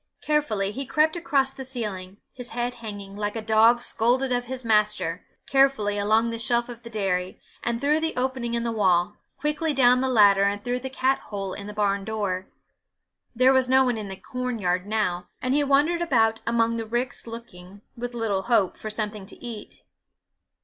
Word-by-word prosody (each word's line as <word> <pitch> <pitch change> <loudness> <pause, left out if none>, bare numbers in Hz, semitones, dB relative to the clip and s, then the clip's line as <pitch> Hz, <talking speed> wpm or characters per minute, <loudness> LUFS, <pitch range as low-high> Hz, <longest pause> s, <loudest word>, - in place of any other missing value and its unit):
Carefully 230 -10 0
he 270 +6 -4
crept 310 +4 +2
across 280 -6 +1
the 270 0 -8
ceiling, 205 -7 -5 0.2
his 245 -2 -8
head 245 +1 -2
hanging, 205 -4 -8
like 205 +1 -3
a - - -2
dog 225 +2 +4
scolded 255 +4 +1
of 245 0 0
his 255 0 -6
master, 210 -6 +1 0.2
carefully 270 -7 +3
along 220 +3 +2
the 230 - -5
shelf 235 +1 0
of 235 -1 -9
the 235 - -10
dairy, 190 -4 -2 0.2
and 235 -1 -1
through 295 +3 +2
the 320 0 -2
opening 250 -2 -1
in 235 - -1
the 235 - -1
wall, 190 -2 +2 0.2
quickly 300 0 -1
down 250 -1 +5
the 265 - 0
ladder, 205 -5 +6
and 200 +1 +1
through 245 0 -1
the 265 +1 -5
cat 265 +1 +1
hole 195 -2 -5
in 200 - -7
the - - -6
barn 200 -1 0
door. 195 -3 -3 0.9
There 255 +3 +5
was 260 -1 +2
no 265 +1 +5
one 245 -2 +1
in 210 - -5
the 190 - -6
corn 250 +3 -4
yard 180 -1 -1
now, 205 -5 -1
and 255 +1 -1
he 290 +1 +3
wandered 290 +5 +2
about 225 -9 +2
among 230 0 +2
the 225 -1 -4
ricks 240 +2 -3
looking, 200 -4 -10
with 245 +1 -5
little 215 -5 0
hope, 210 -4 +1
for 215 - -6
something 210 -2 -4
to - - -11
eat. 230 -4 -9
230 Hz, 195 wpm, -25 LUFS, 205-255 Hz, 0.9 s, ladder